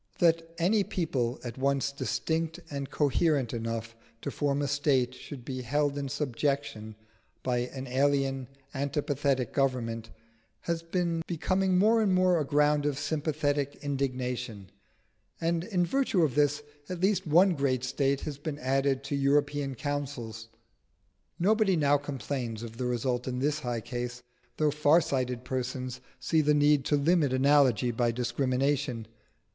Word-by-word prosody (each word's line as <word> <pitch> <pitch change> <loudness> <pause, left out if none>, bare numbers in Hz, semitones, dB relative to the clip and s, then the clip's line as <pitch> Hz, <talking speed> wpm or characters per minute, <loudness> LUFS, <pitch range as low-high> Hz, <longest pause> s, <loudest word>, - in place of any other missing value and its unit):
That 165 -1 +2
any 195 +5 +3
people 130 -11 -1
at 120 +1 -6
once 140 0 +1
distinct 160 +4 -2
and 140 -1 -4
coherent 145 -3 +1
enough 115 0 -4 0.3
to 140 - -2
form 145 0 0
a - - 0
state 135 -3 +1
should 130 -2 -10
be 130 -1 -4
held 145 +3 0
in 140 -1 -3
subjection 135 -5 -2 0.5
by 125 -1 +1
an 130 0 -7
alien 135 0 +1 0.3
antipathetic 140 -2 -1
government 115 -5 -1 0.5
has 170 -1 -2
been 165 -1 -1
becoming 185 +2 +1
more 220 +4 +4
and 195 -4 +3
more 185 -2 +4
a - - +1
ground 150 +1 +2
of 145 -2 -1
sympathetic 145 -2 -1
indignation; 125 -7 -3 0.7
and 165 +1 0
in 180 -5 +1
virtue 210 -3 +2
of 145 -5 +1
this, 145 +1 +2 0.3
at 180 -1 -4
least 190 -1 +1
one 175 +5 +5
great 135 -4 0
State 135 +1 0
has 145 -2 -5
been 145 0 -4
added 135 0 +1
to 140 +1 -2
European 140 0 +1
councils. 130 -5 -4 0.9
Nobody 200 +1 +3
now 145 -2 +4
complains 130 -5 -4
of 115 -1 -8
the 125 - -2
result 125 +1 -1
in 125 -1 -2
this 145 +3 0 0.3
case, 125 0 -4 0.3
though 155 -1 +2
far 150 +2 +5
sighted 125 -5 -2
persons 125 0 -4 0.2
see 155 +6 +2
the 150 0 +3
need 145 -1 +4
to 150 - +2
limit 150 -1 +3
analogy 130 -3 +4
by 120 +1 +1
discrimination. 125 +1 0
140 Hz, 145 wpm, -29 LUFS, 125-150 Hz, 0.9 s, one